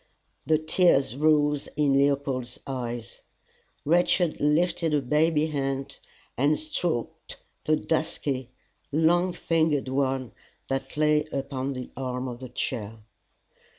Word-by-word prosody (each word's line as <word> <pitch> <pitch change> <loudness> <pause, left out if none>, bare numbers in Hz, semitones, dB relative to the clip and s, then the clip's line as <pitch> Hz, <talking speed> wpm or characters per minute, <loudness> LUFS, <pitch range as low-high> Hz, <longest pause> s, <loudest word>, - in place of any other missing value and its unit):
'" - - -44
The 155 0 +4
tears 155 - +3
rose 150 -1 +2
in 145 -2 +2
Leopold's 135 -3 0
eyes. 120 -3 -5 0.6
Rachel 175 +2 +3
lifted 160 +2 +2
her 145 - +3
baby 150 +3 +2
hand, 135 -3 -3 0.4
and 145 +4 +2
stroked 175 - -3 0.3
the 155 - +4
dusky, 140 -5 -1 0.4
long 170 +4 +3
fingered 160 -6 +1
one 130 -3 0 0.4
that 135 +1 -3
lay 150 0 +3
upon 135 0 -3
the 125 -1 -7
arm 130 -1 -3
of 120 -1 -6
the 130 -1 -8
chair. 115 -3 -4
140 Hz, 120 wpm, -26 LUFS, 130-155 Hz, 0.6 s, The